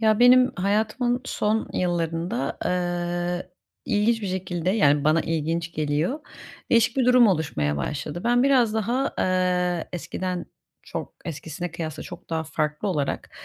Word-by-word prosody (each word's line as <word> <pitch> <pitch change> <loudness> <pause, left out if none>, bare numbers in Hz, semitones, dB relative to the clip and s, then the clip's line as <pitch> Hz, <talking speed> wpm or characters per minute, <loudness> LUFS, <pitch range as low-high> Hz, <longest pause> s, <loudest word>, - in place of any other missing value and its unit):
Ya 215 -1 +3
benim 250 +1 +7
hayatımın 215 +6 +1
son 215 +1 0
yıllarında, 175 +4 -1
ııı, 175 0 -1 0.4
ilginç 220 +2 +1
bir - - -2
şekilde, 185 -2 -2
yani, 145 -8 +3
bana 155 +2 +4
ilginç 165 +1 -2
geliyor, 155 - -1 0.5
değişik 230 +1 +4
bir 260 - +3
durum 250 -1 +7
oluşmaya 145 - 0
başladı. 150 - -3
Ben 245 +1 +3
biraz 255 -5 +4
daha, 235 +5 0
ııı, 180 -2 +1
eskiden, 180 +1 -4 0.4
çok - - -6
eskisine 165 +2 -5
kıyasla, 160 -3 -5
çok - - -11
daha 160 -1 -1
farklı 155 +3 -2
olarak, 145 -7 -2
180 Hz, 135 wpm, -25 LUFS, 165-220 Hz, 0.5 s, benim